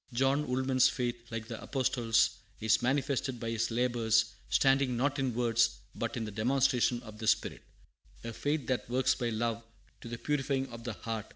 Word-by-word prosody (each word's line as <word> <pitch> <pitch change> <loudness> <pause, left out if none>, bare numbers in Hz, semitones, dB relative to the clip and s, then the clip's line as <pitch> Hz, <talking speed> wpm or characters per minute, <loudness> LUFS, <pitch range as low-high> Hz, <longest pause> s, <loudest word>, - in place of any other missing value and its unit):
John 135 +4 +1
Woolman's 130 0 +3
faith, 120 -1 -2
like 115 -1 -5
the 115 -1 -7
Apostle's, 120 -4 +2 0.3
is 110 0 +3
manifested 130 -1 0
by 115 0 -3
his 115 0 0
labors, 115 -2 +2 0.2
standing 135 -2 +3
not 140 +3 0
in 130 -4 -1
words 115 -1 +2 0.2
but 115 +1 -3
in 115 - -2
the 105 - -6
demonstration 125 +2 +2
of 110 -1 -11
the 110 - -4
spirit, - - +1 0.6
a 115 0 -5
faith 145 +3 -1
that 130 -2 -2
works 130 +1 +2
by 120 - -2
love 115 0 -1 0.4
to - - -9
the 120 - -5
purifying 135 -1 -1
of 115 0 -10
the 120 - -3
heart. 110 +1 -5
120 Hz, 180 wpm, -31 LUFS, 115-130 Hz, 0.6 s, Woolman's